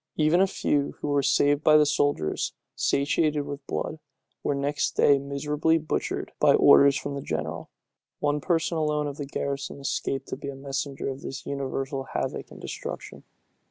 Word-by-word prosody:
Even 155 +4 +3
a 195 - +5
few, 145 -6 0
who 150 - -3
were 145 -1 +3
saved 145 +1 +3
by 155 0 +7
the 150 - +5
soldiers, 145 - 0 0.2
satiated 150 +1 +1
with 145 -1 -6
blood, 160 - -3 0.4
were 145 - 0
next 145 +1 -1
day 140 -1 +5
miserably 150 +3 0
butchered 155 -1 -3
by - - +6
orders 140 0 +7
from 140 - -4
the 140 - -4
general. - - -4 0.5
One 145 0 0
person 165 0 0
alone 150 -1 0
of 145 -1 -5
the 145 - -5
garrison 140 0 -4
escaped 135 -1 -2
to - - -4
be 140 - -6
a 140 - -6
messenger 135 0 -4
of 135 0 -4
this 135 - -7
universal 135 0 -3
havoc - - -2
and - - -12
destruction. - - -7
145 Hz, 170 wpm, -26 LUFS, 140-150 Hz, 0.5 s, by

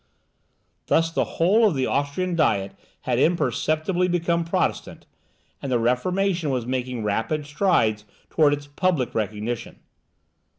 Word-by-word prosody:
Thus 165 0 +2
the - - +1
whole 210 +7 +4
of 185 - 0
the 130 -1 0
Austrian 155 +6 -1
Diet 100 -12 +1 0.3
had 125 -1 -1
imperceptibly 170 +2 +1
become 170 -1 0
Protestant, 165 - -2 0.6
and 135 - -4
the 125 - +3
Reformation 170 +8 0
was 125 -3 -1
making 125 -2 -3
rapid 115 +9 -1
strides 145 - +1 0.3
towards 145 -2 +4
its 145 - -11
public 145 -2 -1
recognition. 110 +2 -3
145 Hz, 125 wpm, -24 LUFS, 125-175 Hz, 0.6 s, whole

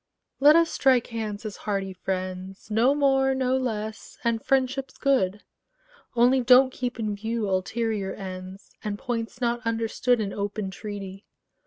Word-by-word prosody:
Let 295 +3 +7
us 335 0 +4
strike 255 -3 +3
hands 215 -1 -4
as 210 - -5
hearty 195 -2 -3
friends; 185 +2 -5
No 240 +6 +4
more, 270 -2 +3
no 260 -1 +1
less: 220 -4 -4
and 230 -1 0
friendship's 265 0 0
good: 210 -8 +1 0.7
Only 250 +2 +4
don't 255 +1 +6
keep 250 -1 -4
in 210 -2 -1
view 220 +1 -2
ulterior 200 +1 -1
ends, 185 0 -8
And 210 -1 -3
points 240 0 -4
not 240 0 0
understood 230 +2 +1
In 200 -2 -2
open 205 -1 -3
treaty. 195 -1 -7
225 Hz, 145 wpm, -26 LUFS, 200-255 Hz, 0.7 s, Let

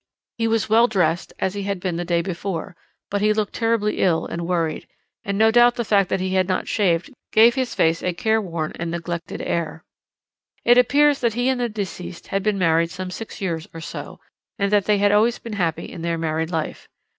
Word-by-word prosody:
He 225 - +2
was 225 -2 +1
well 225 +2 +5
dressed, 185 -5 0
as 190 - -1
he 205 - -4
had 200 -1 -2
been 180 -2 -2
the 175 - -2
day 170 -1 0
before, 175 -1 -4 0.4
but 205 0 0
he 215 0 +3
looked 210 -1 -2
terribly 225 -2 0
ill 170 -4 +2
and 170 0 -4
worried, 165 -3 -1 0.4
and 200 -3 -2
no 220 +1 +5
doubt 240 +1 +5
the 235 - -2
fact 200 -3 +3
that - - 0
he 185 0 -2
had 185 -1 +2
not 185 -1 -1
shaved 180 -1 +1 0.2
gave 230 +2 +6
his 260 -2 -2
face 165 +1 +2
a 180 - 0
careworn 175 -5 -1
and 170 0 -2
neglected 170 0 -5
air. 165 -1 -3 0.8
"It 240 +1 +7
appears 285 +3 +4
that 235 -3 0
he 245 +2 +1
and 260 -2 0
the 240 - 0
deceased 190 -4 -6
had 195 - 0
been 210 0 0
married 165 -2 +2
some 185 +1 -6
six 220 +3 -8
years 165 -4 -3
or - - -6
so, 165 - -8 0.4
and 200 0 0
that 205 -2 +3
they 210 -1 +3
had 205 0 +3
always 220 +3 +3
been 230 - -8
happy 170 -5 -1
in 170 - -9
their 170 0 -1
married 160 0 -1
life. 160 -3 -4
195 Hz, 215 wpm, -22 LUFS, 170-220 Hz, 0.8 s, It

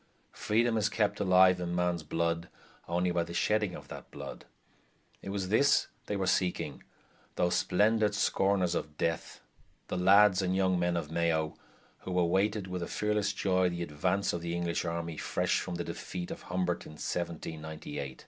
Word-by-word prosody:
Freedom 115 +2 +1
is 105 -1 +2
kept 105 -1 0
alive 90 -1 +5
in 85 -1 -2
man's 90 -1 0
blood 85 +2 -1 0.4
only 90 +1 +1
by 85 -1 +1
the 85 0 -8
shedding 105 -1 +1
of - - -10
that - - -9
blood. - - -8 0.8
It - - -7
was 95 -2 -3
this 140 +7 +4 0.2
they 105 - -1
were 95 -1 -1
seeking, 95 -1 0 0.5
those 90 0 +1
splendid 105 +2 +2
"scorners 95 -3 +2
of 75 -3 -4
death", 85 -1 -2 0.5
the - - -2
lads 95 +1 +6
and 95 0 0
young 95 -1 +2
men 90 0 +1
of 80 -2 -4
Mayo, 80 -2 0 0.4
who 90 -1 -4
awaited 95 +4 +2
with 90 -1 -4
a 85 - -3
fearless 105 -1 0
joy 95 -2 +1
the 85 0 -3
advance 90 +6 0
of 85 - -3
the 85 0 -3
English 85 0 -1
army 85 -1 -3
fresh - - 0
from 90 - -4
the 85 - -2
defeat 90 0 -6
of - - -6
Humbert 90 -1 -1
in - - -10
1798. 80 -4 -5
90 Hz, 170 wpm, -31 LUFS, 85-100 Hz, 0.8 s, lads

